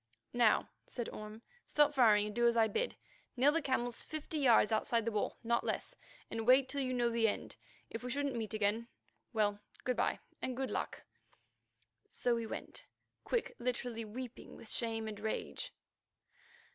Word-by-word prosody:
"Now," 240 -3 +4 0.2
said 240 -3 -4
Orme, 215 +2 -8 0.2
"stop 295 0 +4
firing 220 -6 +6
and 210 - -4
do 240 0 +4
as 235 0 +3
I 225 -1 +6
bid 470 - -1
you. - - -28 0.4
Kneel 270 +4 +6
the 330 +2 +1
camels 245 -4 0
fifty 310 0 -4
yards 235 -5 +5
outside 225 +1 +2
the 230 - +1
wall, 210 -1 -1
not 235 +1 +2
less, - - -3 0.4
and 225 0 -3
wait 260 +1 +7
till 280 +1 -1
you 255 -1 -1
know 240 -2 +2
the 230 -1 +3
end. 205 - -3 0.4
If 225 - -4
we 250 - -5
shouldn't 280 +1 0
meet 220 -2 -3
again, 215 +2 +1 0.4
well, 205 -3 +1 0.2
good 250 - +1
bye - - +2 0.2
and 255 -1 -2
good 265 -1 -1
luck." - - -3 1.1
So 245 - +1
we 230 -1 -1
went, - - -6 0.4
Quick 480 -2 -1
literally 240 -1 -2
weeping 240 +3 -7
with 225 - -6
shame 225 -2 0
and 210 -1 -5
rage. 220 +1 -3
235 Hz, 175 wpm, -35 LUFS, 220-255 Hz, 1.1 s, wait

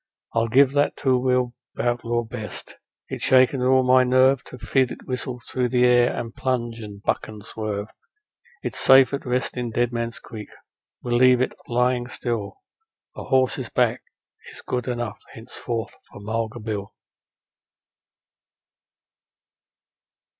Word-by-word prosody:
I'll 115 0 +1
give 130 +4 +5
that 145 +1 +1
two 130 -2 +2
wheeled 125 -1 +1 0.3
outlaw 120 0 0
best; 110 -3 -7 0.3
it's - - -6
shaken 130 0 +4
all 130 +1 +4
my 130 0 +5
nerve 130 +1 +4
To 125 - -10
feel 130 +1 +1
it - - -9
whistle 125 -1 -4
through 125 -1 -1
the 125 0 +3
air 120 -1 +5
and 115 -1 -5
plunge 120 -3 -2
and 105 -2 -9
buck - - -1
and 105 -1 -10
swerve. 105 -2 -4 0.8
It's - - -3
safe 135 0 +6
at 140 - -4
rest 125 +1 -1
in 120 -1 -2
Dead 120 +1 0
Man's 115 -1 -3
Creek, 105 -2 -10 0.5
we'll 120 -1 +1
leave 125 0 +6
it 130 - 0
lying 125 0 +1
still; 120 - -4 0.5
A - - -7
horse's 130 -2 +1
back - - +1 0.5
is - - -10
good 125 0 -2
enough 120 -3 -3
henceforth 115 0 -5 0.2
for - - -12
Mulga 110 +2 -3
Bill.' 105 -2 -5
120 Hz, 140 wpm, -23 LUFS, 115-130 Hz, 0.8 s, safe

